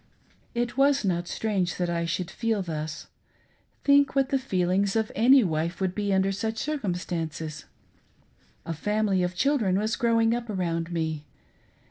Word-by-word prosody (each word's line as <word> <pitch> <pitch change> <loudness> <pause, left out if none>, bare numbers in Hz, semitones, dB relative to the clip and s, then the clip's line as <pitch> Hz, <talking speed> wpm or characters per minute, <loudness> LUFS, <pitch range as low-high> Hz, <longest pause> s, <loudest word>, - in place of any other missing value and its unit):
It 240 +1 -1
was 275 -3 +3
not 175 -2 0
strange 195 -5 -1
that 180 - -1
I 170 -1 -1
should 175 +2 -2
feel 225 -4 -1
thus. 155 -2 -5 0.8
Think 280 -1 +4
what 270 -1 +2
the 275 -1 +1
feelings 195 -3 0
of 220 -1 0
any 255 +4 +6
wife 165 0 -1
would 190 -2 0
be 205 0 -1
under 190 0 +2
such 220 +3 -3
circumstances. 175 - -3 1.0
A 165 - -3
family 210 +3 0
of 180 0 -1
children 225 -6 +2
was 215 +1 0
growing 230 -1 +2
up 240 -1 -3
around 170 -4 -2
me. 160 -3 -2
195 Hz, 150 wpm, -26 LUFS, 175-230 Hz, 1.0 s, any